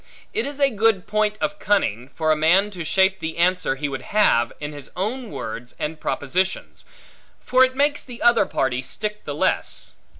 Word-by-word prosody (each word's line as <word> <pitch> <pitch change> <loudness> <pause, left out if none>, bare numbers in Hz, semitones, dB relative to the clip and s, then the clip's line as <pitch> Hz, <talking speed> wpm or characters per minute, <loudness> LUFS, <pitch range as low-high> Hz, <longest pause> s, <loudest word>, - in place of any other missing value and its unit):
It 435 - -1
is 285 0 -6
a 275 -1 +4
good 220 -3 +2
point 215 0 0
of 200 0 -2
cunning, 125 - 0
for 155 -1 +1
a - - +4
man 180 +7 +3
to 180 -4 -6
shape 190 +3 +2
the 160 0 -4
answer 180 -4 +2
he 145 +2 -3
would 135 -2 -5
have, 130 - +2
in 150 0 -5
his 145 -2 -8
own 225 +6 -3
words 120 - -6
and 155 +1 -4
propositions; 180 +7 -2 0.5
for 255 +1 +4
it 260 0 +2
makes 290 +1 +1
the 245 -2 -10
other 240 -1 +5
party 130 -1 0
stick 210 +9 -5
the - - -4
less. - - -1
190 Hz, 190 wpm, -22 LUFS, 150-215 Hz, 0.5 s, other